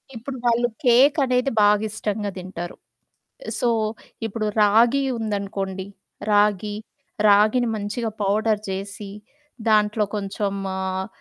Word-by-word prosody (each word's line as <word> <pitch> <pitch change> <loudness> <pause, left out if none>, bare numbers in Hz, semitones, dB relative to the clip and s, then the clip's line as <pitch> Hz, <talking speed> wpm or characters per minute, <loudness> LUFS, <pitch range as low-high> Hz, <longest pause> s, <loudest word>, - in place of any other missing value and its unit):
ఇప్పుడు 255 +4 -6
వాళ్ళు 240 0 +3 0.2
కేకనేది 260 +1 +4
బాగా 210 +1 +4
ఇష్టంగా 210 -1 -3
తింటారు. 180 -1 -6 0.8
సో, 245 - +2 0.6
ఇప్పుడు 220 0 -3 0.2
రాగి 230 +6 +4
ఉందనుకోండి, 195 -3 -3 0.5
రాగి. 205 0 +2 0.5
రాగిని 215 +4 +4
మంచిగా 215 +3 -3
పౌడర్ 210 +1 +1
చేసి, 195 +1 -5 0.6
దాంట్లో 210 0 +3
కొంచెం 200 0 -2 0.2
ఆహ్, 190 0 -2
210 Hz, 95 wpm, -23 LUFS, 200-230 Hz, 0.8 s, కేకనేది